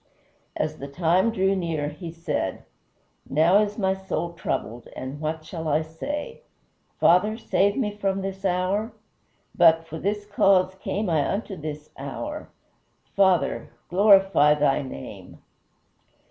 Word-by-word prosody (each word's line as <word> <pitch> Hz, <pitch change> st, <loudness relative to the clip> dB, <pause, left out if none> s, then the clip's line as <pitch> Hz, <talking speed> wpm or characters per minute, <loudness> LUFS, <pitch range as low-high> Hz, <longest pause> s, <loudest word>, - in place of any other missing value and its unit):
As 155 Hz, 0 st, -2 dB
the 140 Hz, -, -6 dB
time 175 Hz, +8 st, +2 dB
drew 195 Hz, -3 st, +1 dB
near, 165 Hz, -5 st, -2 dB
he 165 Hz, +3 st, -8 dB
said, 165 Hz, 0 st, -3 dB, 0.6 s
"Now 165 Hz, +8 st, +4 dB
is 210 Hz, -1 st, -1 dB
my 190 Hz, -3 st, +1 dB
soul 180 Hz, -3 st, -4 dB
troubled, 120 Hz, -7 st, -4 dB
and 130 Hz, +3 st, -6 dB
what 155 Hz, 0 st, -3 dB
shall 160 Hz, -2 st, -6 dB
I 155 Hz, +1 st, +2 dB
say? 175 Hz, -, -6 dB, 0.6 s
Father, 210 Hz, +6 st, +4 dB
save 200 Hz, -3 st, +1 dB
me 210 Hz, -6 st, -1 dB
from 195 Hz, -1 st, -1 dB
this 195 Hz, 0 st, -5 dB
hour? 190 Hz, +4 st, 0 dB, 0.6 s
But, 165 Hz, 0 st, +5 dB
for 160 Hz, 0 st, -7 dB
this 205 Hz, +1 st, -2 dB
cause 195 Hz, -2 st, +3 dB
came 195 Hz, +2 st, -3 dB
I 155 Hz, -5 st, +1 dB
unto 200 Hz, -1 st, -3 dB
this 150 Hz, -2 st, -7 dB
hour; 295 Hz, -, -6 dB, 0.7 s
Father, 190 Hz, -3 st, +2 dB, 0.2 s
glorify 195 Hz, -6 st, +5 dB
thy 145 Hz, -2 st, +2 dB
name!" 130 Hz, -, -9 dB
180 Hz, 130 wpm, -25 LUFS, 155-200 Hz, 0.7 s, But